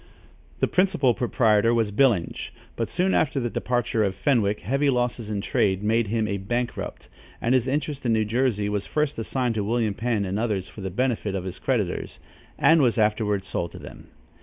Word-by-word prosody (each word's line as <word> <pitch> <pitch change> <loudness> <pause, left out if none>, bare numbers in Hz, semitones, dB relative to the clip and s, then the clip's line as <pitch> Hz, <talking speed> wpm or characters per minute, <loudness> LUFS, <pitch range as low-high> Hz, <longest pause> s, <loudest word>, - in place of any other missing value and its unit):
The - - +3
principal 180 -9 +2
proprietor 115 -2 +2
was 110 -3 +1
Byllinge; 105 -6 +1 0.3
but 115 - -2
soon 185 +2 +1
after 135 -2 +1
the 120 -2 -2
departure 120 -3 0
of 95 -2 -1
Fenwick, 105 -7 +1
heavy 135 +8 +1
losses 120 -3 -1
in 105 -2 -2
trade 95 0 0
made 110 +1 +2
him 110 +1 0
a 100 - -1
bankrupt, 120 +5 -4 0.3
and 120 - +1
his 130 -1 +2
interest 145 +1 -2
in 120 -2 +2
New 110 -1 +2
Jersey 115 -2 0
was 105 -1 -2
first 150 -4 -1
assigned 125 +1 -1
to 105 -2 -1
William 110 0 0
Penn 110 -1 -1
and 95 +2 -2
others 105 -5 -1
for 105 - -11
the 95 - -3
benefit 110 -1 -1
of 95 - -3
his 95 -1 -6
creditors, 110 -9 -2 0.4
and 165 -1 +5
was 120 -4 +2
afterward 105 -2 +1
sold 85 -2 -3
to - - -8
them. - - -11
115 Hz, 190 wpm, -25 LUFS, 105-125 Hz, 0.4 s, and